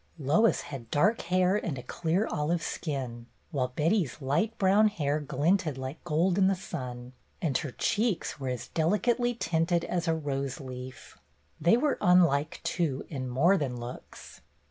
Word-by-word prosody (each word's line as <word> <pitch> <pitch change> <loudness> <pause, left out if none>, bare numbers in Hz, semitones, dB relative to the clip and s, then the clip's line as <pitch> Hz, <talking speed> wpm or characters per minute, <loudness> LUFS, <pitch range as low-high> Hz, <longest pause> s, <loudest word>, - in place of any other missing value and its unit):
Lois 160 +11 +3
had 130 -5 -8
dark 205 +10 +2
hair 185 +2 +2
and 170 -9 -2
a 125 - -7
clear 170 - 0
olive 165 +3 0
skin, 125 -6 -4 0.2
while 135 -5 0
Betty's 150 - 0
light 150 +11 0
brown 200 +3 +5
hair 150 -8 -1
glinted 150 +2 0
like 130 +3 -6
gold 175 +5 +1
in 190 - +5
the 195 - +2
sun, 125 -9 -7 0.3
and 155 -7 -1
her 145 - -4
cheeks 210 - -1
were 135 -2 -3
as 125 -2 -4
delicately 235 +9 +1
tinted 170 -4 0
as 175 -1 -2
a 165 - +2
rose 140 -1 -3
leaf. 130 -1 -9 0.4
They 170 +9 +4
were 290 +3 0
unlike, 165 -5 +3
too, 150 -7 -1
in 130 -4 -4
more 165 +11 +4
than 130 -7 -3
looks. 120 +1 -10
160 Hz, 160 wpm, -29 LUFS, 135-185 Hz, 0.4 s, brown